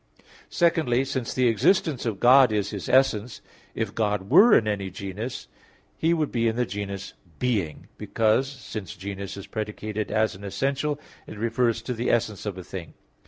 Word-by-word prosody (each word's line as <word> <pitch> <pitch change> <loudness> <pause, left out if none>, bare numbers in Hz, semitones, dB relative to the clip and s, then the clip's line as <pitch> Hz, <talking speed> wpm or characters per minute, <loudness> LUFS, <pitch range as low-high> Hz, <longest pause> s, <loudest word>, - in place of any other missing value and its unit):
Secondly, 155 -7 +2
since 130 -3 -3
the 130 -1 +2
existence 140 - +2
of 105 -4 -2
God 130 0 +7
is 105 -1 -1
His 100 -3 -5
essence, 125 -4 +2 0.4
if 110 -2 -2
God 105 -2 -1
were 205 - +8
in 110 - 0
any 100 -2 -2
genus, 100 +6 -6 0.5
He 165 - +1
would 155 -3 0
be 115 -1 +1
the 120 +2 0
genus 100 -2 -5 0.2
being, 100 -12 -1
because, 115 +4 +1
since 115 - -7
genus 100 +1 -6
is 100 - -7
predicated 105 -1 -4
as 110 -1 +1
an 95 - -12
essential 140 +8 -1 0.3
it - - -9
refers 115 +1 0
to 125 - -3
the 120 +1 -2
essence 110 -3 0
of 100 -2 -4
a 90 - -7
thing. 85 -3 -8
110 Hz, 165 wpm, -25 LUFS, 100-130 Hz, 0.5 s, were